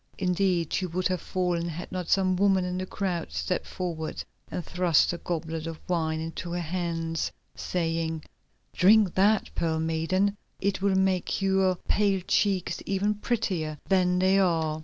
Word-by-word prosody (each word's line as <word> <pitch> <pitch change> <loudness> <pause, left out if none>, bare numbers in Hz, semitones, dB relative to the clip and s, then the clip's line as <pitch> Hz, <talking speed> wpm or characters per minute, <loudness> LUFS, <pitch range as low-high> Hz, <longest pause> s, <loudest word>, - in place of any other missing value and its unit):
Indeed, 180 -3 +1
she 185 - 0
would 180 +2 0
have 185 -2 -1
fallen 175 -2 -1
had 170 +2 -7
not 180 -2 -4
some 185 -1 +3
woman 190 -1 +3
in 180 0 -2
the 185 - -4
crowd 180 - -3
stepped 75 0 -2
forward 165 -3 -4 0.3
and 175 - -4
thrust 175 -2 +3
a 170 - -5
goblet 165 -1 -3
of 165 -1 -5
wine 160 -3 0
into 165 +2 -5
her 175 - -1
hands, 165 -1 -2 0.2
saying: 165 -2 -2 0.5
"Drink 200 0 +5
that, 205 +3 +2
Pearl 160 -1 0
Maiden, 165 +5 +1 0.2
it 195 -1 -1
will 200 -1 +2
make 190 -1 +1
your 190 -1 +2
pale 200 -2 +2
cheeks 195 -4 +1
even 200 +2 +1
prettier 190 -8 -2
than 180 -2 +3
they 190 +2 +4
are." 160 -4 +1
180 Hz, 160 wpm, -27 LUFS, 165-190 Hz, 0.5 s, Drink